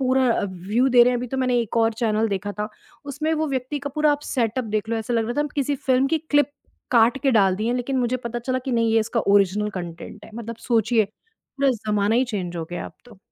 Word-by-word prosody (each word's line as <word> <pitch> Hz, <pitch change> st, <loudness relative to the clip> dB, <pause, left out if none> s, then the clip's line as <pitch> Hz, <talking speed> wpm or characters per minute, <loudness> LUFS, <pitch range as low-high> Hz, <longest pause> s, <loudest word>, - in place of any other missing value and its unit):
पूरा 260 Hz, 0 st, +2 dB
अ, -, -, 0 dB
व्यू 200 Hz, +7 st, 0 dB
दे 245 Hz, -2 st, +7 dB
रहे 250 Hz, -, +4 dB
हैं। 245 Hz, -, 0 dB
अभी 250 Hz, -, -4 dB
तो 265 Hz, -, -4 dB
मैंने 250 Hz, -2 st, +2 dB
एक 230 Hz, 0 st, -4 dB
और 225 Hz, 0 st, +3 dB
चैनल 220 Hz, 0 st, +2 dB
देखा 200 Hz, 0 st, -3 dB
था, 210 Hz, -, -2 dB, 0.4 s
उसमें 295 Hz, +3 st, -2 dB
वो 315 Hz, 0 st, 0 dB
व्यक्ति 260 Hz, +2 st, -2 dB
का 285 Hz, 0 st, -5 dB
पूरा 300 Hz, -1 st, +4 dB
आप 290 Hz, -, -2 dB
सेटअप 240 Hz, 0 st, 0 dB
देख 215 Hz, +1 st, -3 dB
लो। 230 Hz, -, 0 dB
ऐसा 225 Hz, +2 st, -3 dB
लग 225 Hz, -1 st, +2 dB
रहा 240 Hz, -, -3 dB
था -, -, +2 dB
हम 295 Hz, -, -1 dB
किसी 285 Hz, 0 st, 0 dB
फ़िल्म 260 Hz, 0 st, +2 dB
की 325 Hz, -, +1 dB
क्लिप 290 Hz, 0 st, +3 dB, 0.4 s
काट 235 Hz, +2 st, +4 dB
के 275 Hz, -, +3 dB
डाल 195 Hz, -4 st, +4 dB
दी 215 Hz, +3 st, -2 dB
है 245 Hz, -, +1 dB
लेकिन 255 Hz, +2 st, -1 dB
मुझे 250 Hz, 0 st, +1 dB
पता 240 Hz, +1 st, -4 dB
चला 255 Hz, +2 st, -2 dB
कि 265 Hz, -, -2 dB
नहीं 230 Hz, -1 st, +2 dB
ये 225 Hz, -, +4 dB
इसका 230 Hz, +2 st, -1 dB
ओरिजिनल 205 Hz, +2 st, +2 dB
कॉन्टेंट 175 Hz, +4 st, -9 dB
है। -, -, -13 dB
मतलब 230 Hz, 0 st, -6 dB
सोचिए 225 Hz, -1 st, +3 dB
पूरा 275 Hz, -, -4 dB
ज़माना 210 Hz, -2 st, 0 dB
ही 250 Hz, +2 st, +3 dB
चेंज़ 185 Hz, -7 st, -4 dB
हो 165 Hz, -, -3 dB
गया 175 Hz, -, -4 dB
अब -, -, -11 dB
तो। 240 Hz, -5 st, -16 dB
235 Hz, 260 wpm, -23 LUFS, 215-260 Hz, 0.4 s, दे